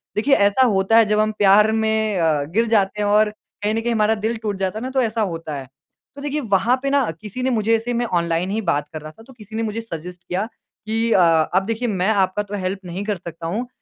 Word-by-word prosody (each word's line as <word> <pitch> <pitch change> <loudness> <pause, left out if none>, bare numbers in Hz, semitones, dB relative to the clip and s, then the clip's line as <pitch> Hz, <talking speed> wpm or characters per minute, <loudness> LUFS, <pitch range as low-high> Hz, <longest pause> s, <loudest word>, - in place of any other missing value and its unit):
देखिए 270 +6 +3
ऐसा 205 +6 +4
होता 195 +3 +3
है 225 - +7
जब 210 0 +1
हम 215 0 +2
प्यार 210 +2 +5
में 220 -2 0
अ, 155 -3 +2
गिर 200 +11 0
जाते 210 -2 +1
हैं 205 - +1
और 210 +1 +4 0.3
कहीं 210 +1 +1
न 225 - -1
कहीं 240 - -1
हमारा 220 0 +2
दिल 220 +2 -2
टूट 210 -3 -3
जाता 195 +3 -2
है - - -7
ना, 260 - -3
तो 265 0 +1
ऐसा 225 -1 -1
होता 165 -3 -5
है। 135 -2 -7 0.5
तो 280 - -9
देखिए 295 +1 -2
वहाँ 225 +6 +3
पे 275 - 0
ना 275 -6 +2
किसी 215 +4 -6
ने 260 - +1
मुझे 225 -1 +2
ऐसे 230 +2 -2
मैं 240 - 0
ऑनलाइन 170 +2 -1
ही 220 +2 -1
बात 145 0 +1
कर 155 - -6
रहा 155 0 -9
था, 225 - -17
तो 265 - -16
किसी 220 -2 -12
ने 225 - -1
मुझे 225 +1 -3
सजेस्ट 175 -3 -8
किया 190 +4 -1 0.4
कि 225 +1 0
अ, 190 - +5 0.3
अब 190 +1 +2
देखिए 230 +3 -2
मैं 190 -1 0
आपका 200 -1 +1
तो 205 0 -6
हेल्प 190 +1 -3
नहीं 180 +3 -5
कर 210 - -1
सकता 165 -1 -8
हूँ। 230 +8 -3
210 Hz, 260 wpm, -21 LUFS, 190-225 Hz, 0.5 s, है